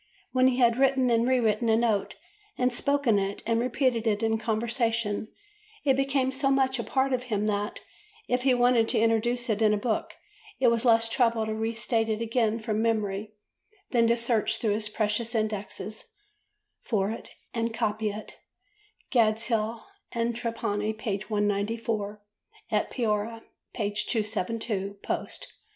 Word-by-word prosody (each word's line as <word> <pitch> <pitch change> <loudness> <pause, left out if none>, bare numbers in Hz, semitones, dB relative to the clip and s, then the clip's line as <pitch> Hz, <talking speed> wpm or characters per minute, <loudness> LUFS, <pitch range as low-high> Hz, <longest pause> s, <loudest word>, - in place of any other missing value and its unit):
When 255 0 +4
he 255 -1 +2
had 235 -2 +4
written 265 -2 +3
and 230 +1 +3
re 260 -1 +3
written 225 0 +1
a 220 - +4
note 225 -4 +1 0.4
and 250 -1 +1
spoken 280 -5 +2
it 195 +1 -3
and 230 +1 +1
repeated 245 -2 +1
it 210 0 +1
in 225 0 +1
conversation, 225 -1 -1 0.6
it 270 -2 +4
became 270 -1 +1
so 270 +1 0
much 265 -1 +2
a - - -1
part 265 +2 +1
of 250 0 -1
him 210 -4 -1
that, 210 0 -2 0.5
if 250 0 +1
he 260 -1 +3
wanted 245 -2 +3
to - - 0
introduce 235 +2 +1
it 220 -1 0
in 210 -1 +4
a - - -1
book, 215 +1 -2 0.4
it 250 - +5
was 235 +1 +1
less 230 -1 +5
trouble 230 -1 +2
to 220 - -2
re 225 +1 -2
state 225 0 0
it 215 0 0
again 230 -1 +1
from 220 -1 -2
memory 215 -2 -1 0.6
than 235 -2 +4
to 235 +1 +3
search 230 -2 +2
through 215 -3 0
his 210 0 -2
"precious 220 +2 -1
indexes" 215 0 -3 0.7
for 205 -3 0
it 225 - -7 0.2
and 230 0 -1
copy 215 -1 -1
it 210 +1 -8 0.7
("Gadshill 225 -1 +1 0.3
and 235 0 -1
Trapani," 220 -2 -2
p. 215 -2 -2
194, 210 0 -1 0.5
"At - - +1
Piora," 225 -1 -1 0.3
p. 210 -2 -1
272 210 -1 -2
post). - - -4
225 Hz, 160 wpm, -27 LUFS, 215-240 Hz, 0.7 s, it